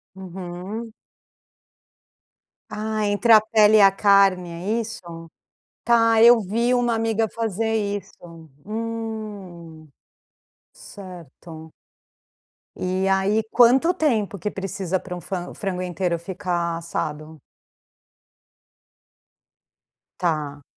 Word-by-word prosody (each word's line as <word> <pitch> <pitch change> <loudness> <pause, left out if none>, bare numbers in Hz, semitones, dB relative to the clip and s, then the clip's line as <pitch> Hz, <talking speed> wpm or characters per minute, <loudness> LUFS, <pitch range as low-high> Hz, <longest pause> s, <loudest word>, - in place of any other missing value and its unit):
Uhum. 190 +4 -7 1.8
Ah, 215 0 -3
entre 205 +3 +1
a 220 - +10
pele 215 0 +4
e 210 - +6
a 195 - +8
carne, 195 -3 +3
é 200 +7 -2
isso? 170 -7 -9 0.5
Tá, 230 -1 +4
eu 235 0 +7
vi 230 +5 0
uma 245 -1 +1
amiga 225 0 0
fazer 225 0 -2
isso. 195 -6 -5 0.2
Hum. 210 -7 -7 0.8
Certo. 165 -4 -12 1.0
E 185 +1 -2
aí, 195 +3 +1
quanto 255 +8 +5
tempo 225 - 0
que 210 +4 -4
precisa 190 -1 -3
pra 180 -1 -8
um 175 - -8
fran 180 0 -5
frango 185 -3 -4
inteiro 175 -1 -2
ficar 175 -2 -3
assado? 155 -2 -5 2.8
Tá. 150 -5 -2
195 Hz, 95 wpm, -22 LUFS, 175-220 Hz, 2.8 s, a